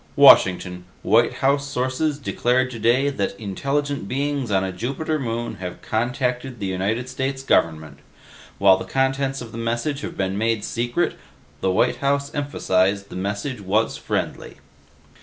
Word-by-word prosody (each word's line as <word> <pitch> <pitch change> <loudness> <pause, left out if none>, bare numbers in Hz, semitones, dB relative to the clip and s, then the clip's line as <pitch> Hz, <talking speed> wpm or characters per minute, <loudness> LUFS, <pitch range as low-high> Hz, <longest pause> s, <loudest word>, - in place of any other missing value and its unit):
"Washington: 90 -1 +6 0.2
White 115 +1 +4
House 140 +1 +2
sources 140 +3 -1
declared 130 -2 0
today 120 +4 +2
that 100 -5 -3
intelligent 140 +5 -2
beings 140 0 -1
on 95 -2 +2
a 95 - -2
Jupiter 135 - -2
moon 120 -2 -3
have 90 -1 -7
contacted 125 +1 -1
the 100 - -3
United 100 +6 -1
States 135 +1 -3
government. 80 -10 +1 0.6
While 95 -1 +6
the - - -6
contents 135 0 0
of 115 -2 -8
the 115 - -7
message 120 +6 -1
have - - -6
been 95 +1 -1
made 115 -1 0
secret, 120 +9 -1 0.4
the 95 - 0
White 95 - +2
House 140 0 0
emphasized 100 -9 0
the - - -9
message 100 +6 -3
was 105 +4 +1
friendly." - - -3
120 Hz, 145 wpm, -22 LUFS, 100-135 Hz, 0.6 s, Washington